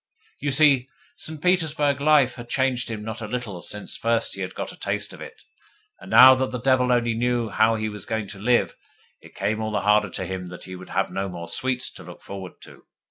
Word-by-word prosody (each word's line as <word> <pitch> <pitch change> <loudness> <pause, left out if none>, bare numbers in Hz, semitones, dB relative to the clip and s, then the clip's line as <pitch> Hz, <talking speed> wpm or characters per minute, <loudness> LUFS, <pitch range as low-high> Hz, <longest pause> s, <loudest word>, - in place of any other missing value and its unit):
You 145 - -2
see, 135 -2 +4 0.3
St. 155 +1 -5
Petersburg 155 -5 +1
life 145 -4 +4
had 120 -1 -10
changed 130 -2 0
him 110 -2 -5
not 110 +1 -6
a 110 - -4
little 105 -6 -5
since 105 -1 -3
first 115 0 0
he - - -5
had - - -5
got - - -5
a - - -12
taste - - -3
of - - -12
it, - - -9 0.6
and, - - -12
now 130 -7 +9
that 130 0 0
the 125 - -4
devil 130 0 +2
only 120 -1 +2
knew 120 0 0
how 110 +3 +3
he 110 0 -2
was 105 -3 -6
going 110 -2 -2
to 100 - -8
live, 120 +3 +2 0.5
it - - -17
came 110 +1 -1
all 110 0 -2
the 105 - -1
harder 105 0 +3
to 95 - -4
him 90 0 -5
that 90 0 -10
he 95 - -9
should 90 0 -10
have 95 +1 -1
no 95 0 -3
more 85 -1 -7
sweets 130 -1 -1
to - - -12
look - - -12
forward 95 -2 -8
to. - - -15
115 Hz, 235 wpm, -24 LUFS, 105-130 Hz, 0.6 s, now